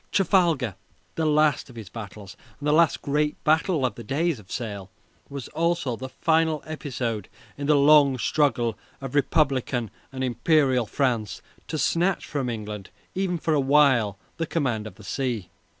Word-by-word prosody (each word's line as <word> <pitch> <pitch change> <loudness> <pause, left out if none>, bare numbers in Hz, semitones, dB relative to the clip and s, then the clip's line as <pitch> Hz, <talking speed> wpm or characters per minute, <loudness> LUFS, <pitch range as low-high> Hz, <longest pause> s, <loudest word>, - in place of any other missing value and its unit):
Trafalgar 170 - +2 0.4
the 160 -1 0
last 150 -1 +2
of 125 - -13
his 110 -4 -8
battles, 100 -2 -9 0.2
and 145 - -4
the 150 - +4
last 165 0 +3
great 150 +1 0
battle 160 -1 +2
of 125 - -1
the 115 - -9
days 145 +4 0
of 100 - -16
the - - -8
sail 100 -5 -5 0.4
was 140 -2 -6
also 165 -5 0
the 130 +3 -7
final 160 0 +1
episode 125 - -4 0.3
in 140 0 -4
the 150 - +5
long 140 -2 +6
struggle 120 -2 +1 0.2
of 135 -2 -7
Republican 135 - +1 0.2
and 130 -1 -4
Imperial 130 0 +2
France 120 -6 -1 0.3
to 155 - -3
snatch 170 +5 +1
from 135 -4 -2
England 105 -3 -6 0.2
even 185 -2 -1
for 160 0 0
a 150 - +3
while 135 -7 +4 0.2
the 165 - -2
command 120 -11 -1
of - - -11
the 105 - -15
sea. 115 -4 -3
140 Hz, 165 wpm, -25 LUFS, 115-155 Hz, 0.4 s, long